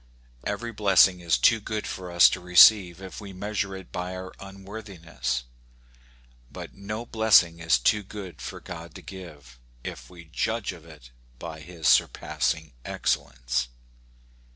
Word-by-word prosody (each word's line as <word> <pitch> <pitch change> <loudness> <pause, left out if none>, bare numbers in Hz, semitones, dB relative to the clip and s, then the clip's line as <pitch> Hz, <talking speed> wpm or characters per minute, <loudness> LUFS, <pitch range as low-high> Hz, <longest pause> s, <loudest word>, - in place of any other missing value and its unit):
Every 115 +3 -3
blessing 95 -3 +4
is 85 -6 +1
too 110 - +4
good 105 0 -4
for 90 -1 -6
us 85 0 +8
to - - -2
receive 90 0 +6
if 95 +3 -8
we 100 -2 -9
measure 100 0 -3
it 95 -2 -11
by 90 +1 -4
our 95 0 -7
unworthiness; 95 - -5 1.1
but - - -9
no 105 +4 -6
blessing 105 -8 +4
is 85 -2 +3
too 105 - +2
good 95 -5 -9
for - - -7
God 85 -1 -9
to - - -10
give, 75 -10 -11 0.2
if - - -8
we 85 -2 -13
judge 110 +7 -2
of 85 -3 -13
it 75 -7 -15 0.3
by 80 +5 -8
his 80 -1 -5
surpassing 80 +1 +1
excellence. - - -1
90 Hz, 145 wpm, -26 LUFS, 80-100 Hz, 1.1 s, us